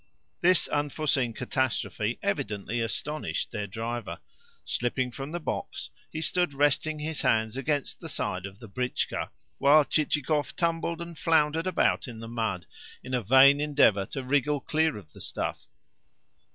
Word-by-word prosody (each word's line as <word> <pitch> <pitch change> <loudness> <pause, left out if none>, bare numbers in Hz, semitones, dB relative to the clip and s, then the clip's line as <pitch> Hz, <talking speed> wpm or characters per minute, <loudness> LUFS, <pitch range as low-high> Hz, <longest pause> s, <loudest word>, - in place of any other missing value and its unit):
This 185 0 +5
unforeseen 145 -4 0
catastrophe 120 -2 -1
evidently 105 +3 -1
astonished 150 +6 -2
their 105 -3 -3
driver. 115 +4 -4 0.5
Slipping 125 +1 0
from 135 +3 -6
the 175 - -3
box, 155 - -4 0.2
he 160 - -5
stood 175 -3 +1
resting 145 +2 +2
his 155 +1 -3
hands 110 0 +2
against 145 +1 -1
the 165 - -7
side 95 -8 -2
of 100 0 -13
the 115 - -11
britchka, 125 +5 -2 0.3
while 145 +2 +6
Chichikov 150 0 0
tumbled 170 0 -1
and 170 -1 -10
floundered 160 +1 +2
about 180 -4 +2
in 120 -2 -8
the 115 - -7
mud, 110 -7 -2 0.4
in 130 - -7
a 125 - +2
vain 135 +6 +7
endeavour 140 -10 +3
to 135 - -5
wriggle 145 +2 +1
clear 155 -3 +1
of 80 -7 -13
the - - -12
stuff. - - -4
135 Hz, 150 wpm, -28 LUFS, 115-155 Hz, 0.5 s, vain